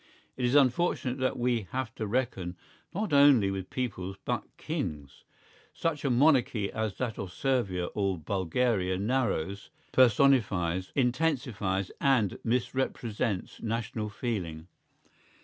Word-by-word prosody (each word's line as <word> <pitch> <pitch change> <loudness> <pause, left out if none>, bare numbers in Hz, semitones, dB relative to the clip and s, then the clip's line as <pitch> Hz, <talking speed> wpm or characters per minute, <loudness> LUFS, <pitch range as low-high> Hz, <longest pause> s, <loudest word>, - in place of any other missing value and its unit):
It 125 - -1
is 120 +3 +2
unfortunate 135 -1 +2
that 130 0 0
we 120 -4 0
have 130 -3 -3
to 110 - -4
reckon 100 -7 -2 0.3
not 205 -3 -2
only 140 -8 +6
with 95 -1 -5
peoples 95 -7 -4
but - - -1
kings. 70 -3 -5 0.5
Such 160 -4 -2
a 140 - +1
monarchy 125 -6 +3
as 110 -2 -2
that 120 -4 -3
of 95 -3 -5
Servia 100 -9 0
or 100 -3 0
Bulgaria 95 +3 0
narrows, 100 -4 -1 0.2
personifies, 100 -9 +3
intensifies 125 - 0
and 125 -9 +2
misrepresents 115 -4 -1
national 115 -1 -3
feeling. 95 -9 -4
115 Hz, 115 wpm, -29 LUFS, 95-130 Hz, 0.5 s, only